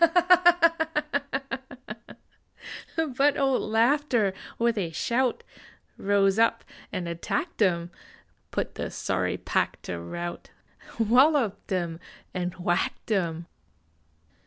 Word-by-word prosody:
But 285 Hz, +1 st, +4 dB
old 270 Hz, -2 st, +2 dB
Laughter 235 Hz, -3 st, +2 dB, 0.2 s
with 235 Hz, 0 st, +2 dB
a 190 Hz, -6 st, -1 dB
shout 240 Hz, +9 st, 0 dB, 0.5 s
Rose 195 Hz, 0 st, +2 dB
up 230 Hz, 0 st, +3 dB, 0.3 s
and 185 Hz, -4 st, -3 dB
attacked 170 Hz, -, -3 dB
em; 175 Hz, -3 st, +2 dB, 0.6 s
Put -, -, -3 dB
the -, -, -4 dB
sorry -, -, -1 dB
pack -, -, -1 dB
to 85 Hz, -, -5 dB
rout, 170 Hz, -, -6 dB, 0.5 s
Walloped 240 Hz, -1 st, +3 dB
em 170 Hz, -3 st, -1 dB, 0.3 s
and 180 Hz, -1 st, -3 dB
whacked 175 Hz, +4 st, -1 dB
em. 170 Hz, -5 st, 0 dB
200 Hz, 90 wpm, -27 LUFS, 175-240 Hz, 0.6 s, But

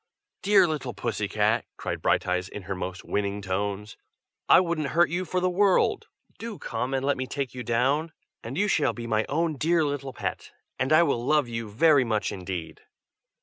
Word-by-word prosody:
"Dear 200 Hz, -2 st, +5 dB
little 135 Hz, -8 st, -4 dB
Pusscat!" -, -, 0 dB
cried -, -, -4 dB
Brighteyes 90 Hz, +1 st, +1 dB
in 105 Hz, -, -8 dB
her 95 Hz, +2 st, -4 dB
most 95 Hz, 0 st, -5 dB
winning 100 Hz, 0 st, -1 dB
tones. 100 Hz, +2 st, -3 dB, 0.5 s
"I -, -, +9 dB
wouldn't 170 Hz, -5 st, -1 dB
hurt 175 Hz, -2 st, +5 dB
you 180 Hz, +2 st, -1 dB
for 180 Hz, +2 st, -1 dB
the 180 Hz, -, +1 dB
world. 190 Hz, +1 st, +2 dB, 0.3 s
Do 225 Hz, -3 st, -6 dB
come, 125 Hz, +3 st, -3 dB
and 135 Hz, 0 st, -1 dB
let 140 Hz, 0 st, +1 dB
me 130 Hz, 0 st, -3 dB
take 140 Hz, -2 st, -4 dB
you 125 Hz, -, -6 dB
down, 135 Hz, +7 st, +1 dB, 0.3 s
and 125 Hz, +5 st, -6 dB
you 205 Hz, -, +2 dB
shall 160 Hz, -6 st, +2 dB
be 120 Hz, -, -7 dB
my 110 Hz, -1 st, +1 dB
own 160 Hz, 0 st, 0 dB
dear 165 Hz, +3 st, +2 dB
little 140 Hz, -2 st, -3 dB
pet, -, -, -5 dB, 0.3 s
and 130 Hz, +3 st, 0 dB
I 155 Hz, +2 st, +7 dB
will 140 Hz, -7 st, 0 dB
love 150 Hz, 0 st, +2 dB
you 115 Hz, -2 st, -5 dB
very 140 Hz, +6 st, +4 dB
much 110 Hz, -3 st, -1 dB
indeed!" 90 Hz, -3 st, -6 dB
130 Hz, 190 wpm, -26 LUFS, 105-160 Hz, 0.5 s, I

